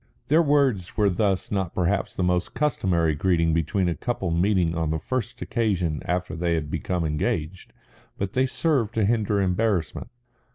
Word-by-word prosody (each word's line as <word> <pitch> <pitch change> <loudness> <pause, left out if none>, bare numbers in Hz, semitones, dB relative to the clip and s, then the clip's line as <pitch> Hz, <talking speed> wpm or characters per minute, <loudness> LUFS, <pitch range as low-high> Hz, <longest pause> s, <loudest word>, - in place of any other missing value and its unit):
Their 155 +4 +5
words 140 - +1
were 105 -2 +3
thus 95 0 0
not 95 -4 -2
perhaps 95 +2 0
the 95 - -1
most 90 0 0
customary 90 - +1
greeting 85 +1 +1
between 85 +4 0
a 85 - +1
couple 100 -4 -3
meeting 85 -1 +2
on 80 -2 -1
the 80 - 0
first 130 +9 -3
occasion 95 -10 -1
after 90 +1 -2
they 85 0 0
have 75 -2 -3
become 90 -3 -2
engaged, 80 +3 -2 0.5
but 100 0 -3
they 130 +1 +2
served 130 -6 0
to 110 -2 +2
hinder 105 -2 +1
embarrassment. 95 -3 0
95 Hz, 165 wpm, -25 LUFS, 85-110 Hz, 0.5 s, Their